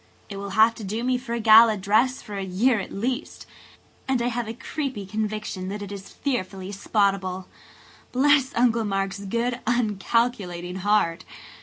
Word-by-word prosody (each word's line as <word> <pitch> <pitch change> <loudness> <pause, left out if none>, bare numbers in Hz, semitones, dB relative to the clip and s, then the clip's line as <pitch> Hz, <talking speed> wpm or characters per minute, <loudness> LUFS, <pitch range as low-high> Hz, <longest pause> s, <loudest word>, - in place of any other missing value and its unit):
"It 200 - -6
will 200 0 -5
have 220 +1 +6
to - - -7
do 215 +4 -3
me 250 0 +1
for 245 -2 -6
a 235 - -1
gala 220 0 +7
dress 220 +7 +1
for 210 - -8
a 195 - -3
year 210 +6 +2
at 195 - -6
least–and 255 +2 -5
I 240 +1 0
have 240 -1 -3
a 225 - -4
creepy 260 -5 -4
conviction 210 -2 -3
that 205 +1 -5
it 200 - -8
is 195 -1 -8
fearfully 195 -8 -3
spottable. 195 -2 0 0.7
Bless 275 +1 +3
Uncle 235 -1 +3
Mark's 195 -1 -2
good, 235 +5 -2
uncalculating 210 -5 0
heart! 190 -3 +1
215 Hz, 160 wpm, -24 LUFS, 195-240 Hz, 0.7 s, gala